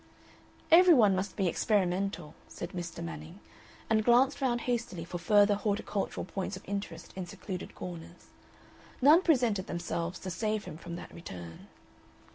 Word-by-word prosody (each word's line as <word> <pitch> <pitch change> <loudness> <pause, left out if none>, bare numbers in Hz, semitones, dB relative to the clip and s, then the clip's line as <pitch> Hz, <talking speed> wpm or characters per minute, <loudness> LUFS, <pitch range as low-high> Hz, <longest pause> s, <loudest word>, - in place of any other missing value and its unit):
"Every 350 0 +8
one 210 -6 +5
must 190 +2 -3
be 195 -3 +1
experimental," 185 -3 0
said - - -7
Mr. 175 - -6
Manning, 80 -2 -8 0.5
and 220 -1 +2
glanced 255 +5 +4
round 240 -3 +1
hastily 235 -9 -2
for 175 +1 -5
further 205 +3 +5
horticultural 205 -2 -2
points 195 +1 -4
of 185 - -13
interest 200 -5 -5
in 185 -2 -5
secluded 185 +1 -7
corners. 170 -1 -9 0.7
None 300 +7 +7
presented 240 - +2
themselves 170 0 -3
to 185 - -5
save 215 +3 -1
him - - -7
from 170 0 -7
that 175 - -9
return. 90 - -9
195 Hz, 145 wpm, -30 LUFS, 175-220 Hz, 0.7 s, Every